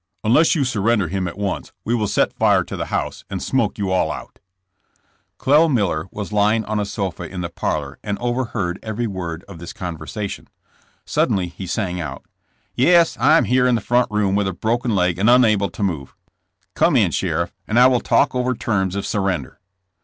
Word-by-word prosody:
Unless 130 +11 +4
you 150 - +1
surrender 110 -6 +1
him 95 0 -2
at 90 - -7
once 100 -2 -3
we 115 - 0
will 110 -3 +1
set - - +1
fire - - +3
to - - -7
the - - -4
house - - -3
and - - -3
smoke - - 0
you 100 -2 -2
all 95 - +1
out." - - -9 1.0
Clel. 150 +4 +4
IMiller 95 - 0
was 105 -1 -6
lying 105 +2 +2
on 105 0 -2
a 105 - -1
sofa 95 -3 -4
in 90 -2 -6
the 85 - -3
parlor 75 -4 -3
and 100 -1 -2
overheard 120 -7 -2
every 110 +2 -3
word 90 -5 -5
of 95 -5 -11
this 85 - -8
conversation. 90 +4 -6 0.6
Sud - - +1
denly 90 -3 -1
he 95 - -7
sang 90 -1 -2
out: 70 -4 -7 0.5
*'Yes, 170 +6 +4
I 155 - +5
am - - +3
here 125 0 +2
in 125 - +3
the - - +1
front 120 +4 +1
room 105 -2 0
with 100 0 +1
a 95 - -2
broken 115 +4 -1
leg 90 -2 +1
and 105 +4 +3
unable 110 -5 +4
to 90 +4 -5
move. 80 -9 -3 0.6
Come - - +3
in - - +3
sheriff, - - -1
and 110 - 0
I 125 - +8
will 130 -2 +4
talk - - +2
over 125 0 0
terms 95 -5 -1
of 100 - -3
surrender." 95 -9 -2
105 Hz, 200 wpm, -21 LUFS, 90-120 Hz, 1.0 s, I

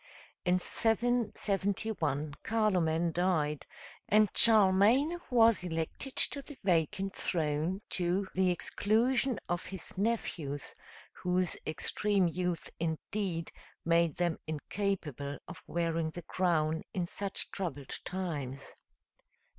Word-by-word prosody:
In 180 0 +3
771 205 - 0
Carloman 175 -7 +1
died, 160 -4 0 0.4
and 215 -1 +4
Charlemagne 225 - +6
was 230 -5 +4
elected 165 - -3
to 280 - +2
the 275 0 -11
vacant 190 +2 0
throne, 160 +4 -1
to 185 +2 0
the 185 0 +2
exclusion 235 +8 +2
of 175 0 -2
his 190 -2 -6
nephews, 170 - -2 0.4
whose 180 0 0
extreme 195 +4 +2
youth, 180 0 -2
indeed, 165 +1 -3 0.3
made 170 -2 +2
them 175 -2 0
incapable 155 -3 -3
of 180 - -10
wearing 165 -1 -1
the 175 +2 -8
crown 160 -3 0
in 180 -2 0
such 200 +3 0
troubled 145 -8 -4
times. 145 -8 -5
180 Hz, 100 wpm, -31 LUFS, 160-205 Hz, 0.4 s, Charlemagne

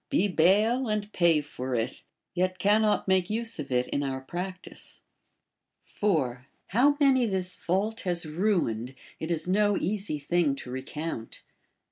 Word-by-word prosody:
Be 200 - +2
bail, 210 +8 +3
and 210 -1 -2
pay 170 -4 +4
for 130 -3 -5
it, 115 +2 -2 0.3
yet 185 +1 0
cannot 210 +2 +2
make 190 -1 +2
use 225 -2 -3
of 140 -2 -5
it 125 0 +2
in 140 - -1
our 135 -2 -2
practice. 180 +7 -7 0.8
4. 130 -11 -1 0.2
How 275 +8 +4
many 265 -4 +4
this 185 -3 -1
fault 195 +7 -1
has 175 -2 -1
ruined, 155 - 0 0.2
it 160 - -4
is 165 -1 0
no 205 +2 +3
easy 195 -4 -1
thing 150 0 +1
to 125 - -8
recount. 130 -1 -5
180 Hz, 145 wpm, -28 LUFS, 145-210 Hz, 0.8 s, pay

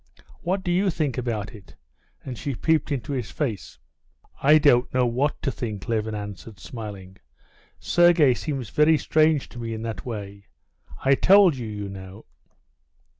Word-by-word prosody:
"What 190 +2 -1
do 175 - -1
you 190 +3 +2
think 150 -7 -1
about 110 -4 -3
it?" 105 -4 -15 0.5
And 130 - -5
she 140 +3 -4
peeped 160 +3 +1
into 140 +1 -3
his 125 -5 -3
face. 115 - -4 0.6
"I 150 +3 +6
don't 130 -5 +3
know 125 -1 +2
what 130 +5 0
to 135 - 0
think," 110 -5 -6
Levin 110 -2 -1
answered, 105 0 -8
smiling. 100 -5 -9 0.6
"Sergey 175 -6 +4
seems 135 -4 -4
very 155 +1 +4
strange 155 -1 +2
to 120 - -10
me 115 -1 -4
in 110 - -6
that 115 -1 -5
way. 100 -4 -7 0.6
I 135 - +5
told 190 +2 +5
you, 120 -3 -6
you 105 -1 -5
know...." 95 +2 -10
125 Hz, 160 wpm, -24 LUFS, 105-150 Hz, 0.6 s, I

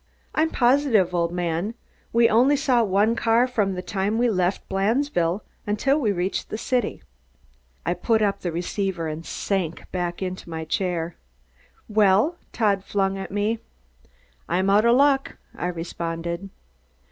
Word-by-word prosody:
"I'm 315 +1 +2
positive, 240 - +3
old 170 -1 +1
man. 175 +4 -2 0.4
We 230 0 +5
only 250 +7 +4
saw 260 -4 +2
one 205 +3 +2
car 230 +1 +3
from 210 -7 0
the 180 - -5
time 195 +3 -1
we 240 0 +3
left 185 -1 0
Blandesville, 195 - +1 0.3
until 270 +8 +2
we 225 -8 +1
reached 185 0 -2
the 215 - -3
city." 245 0 -1 0.8
I 175 - +1
put 220 +5 +1
up 200 -1 +1
the 175 - -3
receiver 175 0 -2
and 155 +1 -5
sank 175 -3 -2
back 175 0 -2
in 185 0 -2
my 160 -1 -5
chair. 170 0 -2 0.7
"Well?" 215 - +3
Todd 200 -4 +1
flung 195 -1 0
at 190 - -5
me. 210 +3 0 0.9
"I'm 185 +3 +2
out 210 +3 +4
of 235 +1 +5
luck!" 275 0 +3 0.2
I 175 - -3
responded. 170 +1 -4
195 Hz, 145 wpm, -24 LUFS, 175-230 Hz, 0.9 s, We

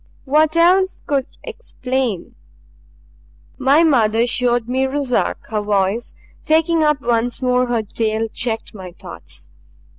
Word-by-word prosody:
What 310 +3 +2
else 375 +3 +3
could 275 -2 -1 0.2
explain 260 - -4 1.3
"My 275 +5 +4
mother 230 -7 +3
showed 240 -1 +2
me 260 +2 0
Ruszark," 270 -2 -1
her 215 -1 -1
voice, 205 +2 -1 0.3
taking 320 +1 +2
up 300 -2 +1
once 235 -1 0
more 250 -1 +1
her 235 -2 -1
tale, 220 +1 -2
checked 225 0 -3
my 185 -4 -10
thoughts. 115 - -11
250 Hz, 120 wpm, -19 LUFS, 225-290 Hz, 1.3 s, My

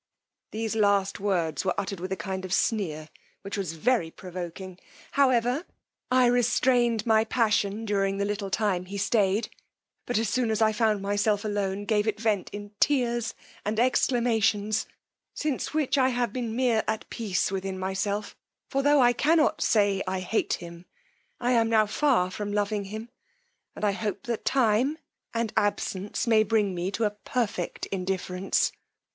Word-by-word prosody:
These 220 0 -3
last 200 -2 +2
words 175 -6 0
were 190 -2 0
uttered 195 -1 -4
with 185 +2 -5
a - - +1
kind 190 +2 -4
of 185 - -6
sneer, 160 -9 -1 0.3
which 200 +2 -5
was 190 -6 -3
very 175 +1 +1
provoking, 180 +1 -8 0.3
however, 255 +1 +2 0.5
I 255 0 +4
restrained 240 -1 +2
my 220 -1 +4
passion 215 -2 +1
during 195 -2 0
the 200 - 0
little 205 -1 -3
time 195 -3 0
he 200 +2 -6
stayed; 205 +1 +1 0.6
but 245 - 0
as 225 0 +1
soon 235 +2 0
as 220 - 0
I 220 -1 +4
found 215 -2 +1
myself 205 +1 +1
alone 205 -1 -2
gave 210 0 +1
it 215 -1 -1
vent 215 -4 0
in 205 0 -8
tears 240 -5 +1 0.3
and 215 +1 -1
exclamations, 225 -4 +2 0.5
since 300 -4 -2
which 290 -2 +1
I 260 0 +4
have 245 -3 -1
been 235 -3 -3
mere 240 -3 +2
at 220 0 -2
peace 195 -5 -1
within 190 0 -3
myself; 195 +2 -2 0.4
for 275 - +1
tho' 290 +1 +4
I 245 -1 +5
cannot 305 +5 +2
say 200 -3 +3
I 185 0 -1
hate 190 +4 0
him, 170 0 -7 0.5
I 245 0 0
am 230 -2 +3
now 220 -1 +4
far 215 -5 +2
from 205 +1 -4
loving 205 0 -1
him, 215 +4 -7 0.7
and - - -2
hope 200 -1 -1
that 235 -2 -4
time 260 +3 +2 0.3
and 230 -1 -2
absence 205 0 -1
may 225 -2 +5
bring 215 -2 +1
me 175 +1 -2
to 220 +3 -2
a 210 - +2
perfect 210 -3 -3
indifference. 185 0 -1
210 Hz, 160 wpm, -27 LUFS, 195-235 Hz, 0.7 s, I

